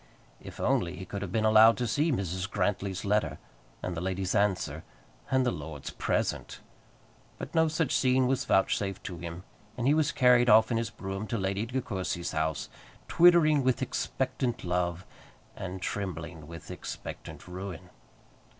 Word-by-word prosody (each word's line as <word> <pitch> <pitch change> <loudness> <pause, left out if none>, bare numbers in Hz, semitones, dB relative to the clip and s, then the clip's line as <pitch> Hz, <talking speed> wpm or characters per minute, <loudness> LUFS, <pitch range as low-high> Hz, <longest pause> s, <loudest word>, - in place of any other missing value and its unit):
If - - -10
only 85 +1 +1
he 95 +1 -7
could 100 +2 -5
have 100 -3 -4
been 110 +1 +1
allowed 110 +1 +7
to 125 - -1
see 150 +7 +1
Mrs. 95 - -2
Grantly's 100 -2 -1
letter, 105 +1 +1 0.5
and 90 - -3
the 80 - -3
lady's 95 0 -2
answer, 100 -2 0 0.5
and 130 -1 +2
the 125 - +2
lord's 75 -3 -6
present! - - -2 0.8
But - - -7
no 160 0 +4
such 155 -2 0
seeing 130 0 +3
was 130 +1 0
vouchsafed 95 0 +1
to 90 -4 -6
him, 85 +1 -7 0.3
and 120 - -2
he 140 - +5
was 155 -1 +2
carried 125 -2 +5
off 110 +1 +6
in 115 - +2
his 115 0 -1
brougham 95 +2 -5
to 115 - -2
Lady 100 +2 -1
De 130 +2 -1
Courcy's 90 -4 -3
house, 80 -2 -1 0.4
twittering 165 -4 +5
with 130 0 +1
expectant 130 -2 -2
love, 90 0 -1 0.5
and 95 0 -6
trembling 85 -5 -4
with 85 -1 -9
expectant - - -8
ruin. 90 -1 -7
100 Hz, 160 wpm, -29 LUFS, 90-125 Hz, 0.8 s, allowed